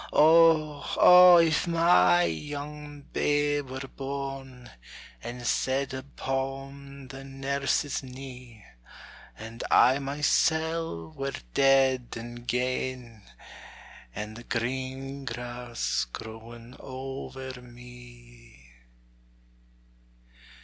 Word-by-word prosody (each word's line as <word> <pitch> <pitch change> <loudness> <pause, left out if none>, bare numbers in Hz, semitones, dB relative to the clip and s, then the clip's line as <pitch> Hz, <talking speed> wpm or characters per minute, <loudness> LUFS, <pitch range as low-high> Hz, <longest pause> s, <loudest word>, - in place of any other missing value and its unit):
Oh, 155 -2 +4
oh! 180 0 +9
if 165 0 +3
my 165 - +4
young 145 - -5
babe 145 -1 +1
were 130 0 -6
born, 135 -2 -7 0.5
And 120 +1 -7
set 135 +3 0
upon 135 0 -5
the 135 +1 -9
nurse's 135 +1 -1
knee; 125 -4 -11 0.7
And 110 +2 -8
I 130 +3 +5
mysel' 150 - 0
were 135 +8 -4 0.2
dead 135 -2 +3
and 120 +1 -9
gane, 125 -2 -2 0.9
And 105 +1 -6
the 120 - -10
green 130 +3 -4
grass 120 - -3
growing 115 - -10
over 130 -1 -7
me! 120 - -15
130 Hz, 80 wpm, -27 LUFS, 120-140 Hz, 0.9 s, oh